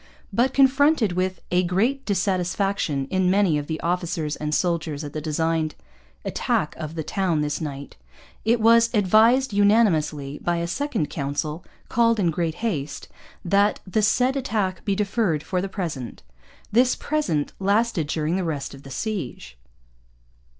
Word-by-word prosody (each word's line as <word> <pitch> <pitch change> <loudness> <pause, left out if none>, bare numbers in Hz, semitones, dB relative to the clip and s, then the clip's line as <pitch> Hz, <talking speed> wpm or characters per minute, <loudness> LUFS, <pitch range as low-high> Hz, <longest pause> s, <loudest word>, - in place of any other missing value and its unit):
But, 245 +5 +2
confronted 275 - +4
with 185 +1 -2
'a 180 0 +3
great 215 +10 0
Dissatysfaction 190 -5 0
in 185 -1 +2
many 190 -5 +3
of 145 - -6
the 160 -1 -3
officers 170 -3 -1
and 150 0 -4
Souldiers 160 -3 -1
at 145 0 -7
the 155 - -4
designed 160 0 -1 0.5
attack - - -1
of 155 +1 -6
the 160 - -3
towne 175 -3 0
this 150 +1 -2
Night,' 140 -2 -6 0.5
it 230 +2 +2
was 230 +1 +5
'Advised, 220 +5 +4
Unanimously,' 170 -9 +2
by 175 0 -1
a 170 - -1
second 215 - -2
council, 150 +3 -3 0.2
called 230 -1 +2
in 175 -4 +2
great 165 0 -2
haste, 150 -10 -3 0.4
'that 200 +3 +3
the 210 +3 0
Said 250 +5 +2
Attack 210 -8 -1
be 200 - +1
deferred 195 -6 0
for 185 -1 -1
the 195 - -4
Present.' 160 - -5 0.5
This 245 +3 +4
'Present' 285 - -1
lasted 200 -4 +1
during 155 +3 -1
the 190 - -1
rest 150 -5 -3
of 135 - -11
the 135 - -12
siege. 135 - -5
180 Hz, 150 wpm, -24 LUFS, 155-215 Hz, 0.5 s, was